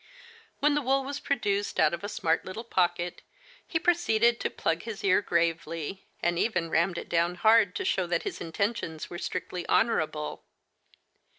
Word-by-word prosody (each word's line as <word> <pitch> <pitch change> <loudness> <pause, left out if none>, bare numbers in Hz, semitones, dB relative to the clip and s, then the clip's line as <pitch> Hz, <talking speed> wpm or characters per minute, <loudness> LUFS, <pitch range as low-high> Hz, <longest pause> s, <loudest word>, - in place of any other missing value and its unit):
When 295 0 +4
the 295 - +1
wool 270 +1 +2
was 280 +1 -4
produced 205 -7 -1
out 155 +1 +4
of 170 - -4
a 205 - -3
smart 165 -5 0
little 215 +5 -6
pocket, 175 -4 0 0.5
he 330 - 0
proceeded 240 -10 +3
to - - -1
plug 165 0 -1
his 220 -2 -7
ear 195 0 +4
gravely, 165 0 -1 0.2
and 175 0 +1
even 170 -8 0
rammed 170 +2 +2
it - - -5
down 170 +1 +1
hard 215 +1 +4
to - - -2
show 185 -2 +1
that 170 -1 0
his - - -5
intentions 165 -2 -3
were 175 - -5
strictly 180 -1 -4
honorable. 160 -9 0
185 Hz, 170 wpm, -28 LUFS, 170-225 Hz, 0.5 s, When